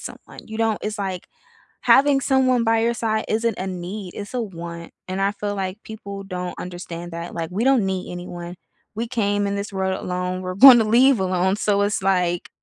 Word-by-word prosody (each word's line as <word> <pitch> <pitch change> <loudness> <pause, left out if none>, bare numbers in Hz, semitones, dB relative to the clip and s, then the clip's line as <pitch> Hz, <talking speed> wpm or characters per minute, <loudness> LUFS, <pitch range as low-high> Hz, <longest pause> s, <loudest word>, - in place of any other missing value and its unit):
someone, - - -10
you 220 -1 -7
don't 225 -2 +1
it's 210 0 -4
like 190 -3 -4 0.6
having 275 0 +5
someone 255 -3 +2
by 225 0 +3
your 235 +1 +1
side 220 -2 -1
isn't 225 0 0
a 185 - -3
need, 185 +1 -6
it's 205 +4 -7
a 245 - -1
want 170 -4 -7 0.2
and 185 +1 -3
I 200 +1 +2
feel 205 0 -4
like, 195 +2 -4
people 200 -2 -8
don't 180 -2 -5
understand 175 -1 -7
that, 170 +1 -6
like, 165 -1 -4
we 210 +6 -1
don't 260 -6 +3
need 190 -1 -3
anyone, 175 0 -7 0.4
we 230 +2 -3
came 205 -4 0
in 200 - -2
this 200 +1 -4
world 190 0 -1
alone, 180 0 -3
we're 185 0 -4
gonna 240 0 +9
leave 240 +2 +4
alone, 185 +1 +1
so, 205 -1 +1
it's 205 -1 0
like, 180 -2 +1
200 Hz, 200 wpm, -22 LUFS, 180-225 Hz, 0.6 s, gonna